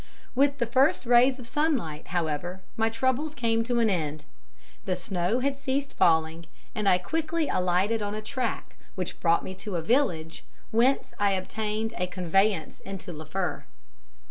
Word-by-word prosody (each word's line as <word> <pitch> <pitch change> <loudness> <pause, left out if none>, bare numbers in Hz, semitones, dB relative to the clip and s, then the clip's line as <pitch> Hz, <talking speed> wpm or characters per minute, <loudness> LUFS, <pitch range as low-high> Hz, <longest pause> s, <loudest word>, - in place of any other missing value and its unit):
With 280 +2 +3
the 240 - +1
first 260 +3 +3
rays 245 +2 +5
of 250 -3 -9
sunlight, 240 - -1
however, 175 +2 -2
my 225 0 +2
troubles 260 +6 0
came 230 -1 +1
to 245 0 0
an 230 - +4
end. 155 -6 -1 0.6
The 185 - 0
snow 180 +5 -1
had 275 +1 -1
ceased 275 0 -2
falling, 160 0 +2 0.3
and 210 -4 +1
I 180 - +5
quickly 320 - -1
alighted 185 +5 +1
on 205 0 -2
a 215 - -4
track, 250 +1 -3 0.2
which 180 -2 -4
brought 170 -1 +3
me 185 - -5
to 190 +1 -6
a 170 - 0
village, 170 - +1 0.3
whence 245 +5 +2
I 200 -1 +3
obtained 215 +4 -2
a 180 - -1
conveyance 185 0 +1
into 195 -2 -7
Liffre. 160 +4 -3
210 Hz, 160 wpm, -27 LUFS, 180-255 Hz, 0.6 s, rays